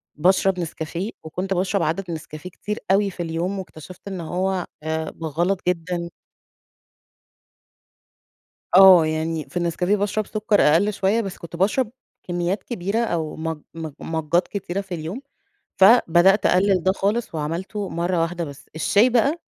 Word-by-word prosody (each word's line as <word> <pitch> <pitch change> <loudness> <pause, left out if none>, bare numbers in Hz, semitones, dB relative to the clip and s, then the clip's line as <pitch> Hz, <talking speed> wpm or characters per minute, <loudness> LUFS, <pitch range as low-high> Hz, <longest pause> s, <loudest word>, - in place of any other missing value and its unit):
باشرب 185 +3 +2
نسكافيه 170 +4 -4
وكنت 185 +5 -3
باشرب 190 +1 0
عدد 175 +3 -2
نسكافيه 155 +1 -7
كتير 210 +4 -5
أوي 200 +1 +3
في 175 -1 -5
اليوم 170 +4 -2
واكتشفت 180 +1 -11
إن 190 -3 -5
هو 185 +2 -2 0.2
آآ 160 0 -3
غلط 175 +5 0
جدًا. 170 0 -1 2.7
آه. 185 -3 +9
يعني 155 0 -2
في - - -16
النسكافيه 175 +3 +1
باشرب 205 +1 -1
سُكّر 215 -1 +1
أقَل 175 +8 +4
شوية، 200 +4 +1
بس 195 -4 -5
كنت 170 0 -9
باشرب 215 +6 +1 0.4
كمّيات 175 +3 -1
كبيرة 200 -1 -3
أو 170 -9 -1
ماج 160 0 -3 0.2
ماج 160 -2 -6
ماجات 160 +2 0
كتيرة 195 -1 -3
في 195 -2 -6
اليوم، 170 - -5 0.6
فبدأت 195 -2 +5
أقلِّل 185 -1 +3
ده 190 - +4
خالص 205 +1 -1
وعملته 175 +7 -3
مرّة 175 +1 0
واحدة 170 +1 -2
بس. 140 -1 -11
الشاي 210 +9 +3
بقى 275 +8 +2
180 Hz, 140 wpm, -22 LUFS, 165-200 Hz, 2.7 s, آه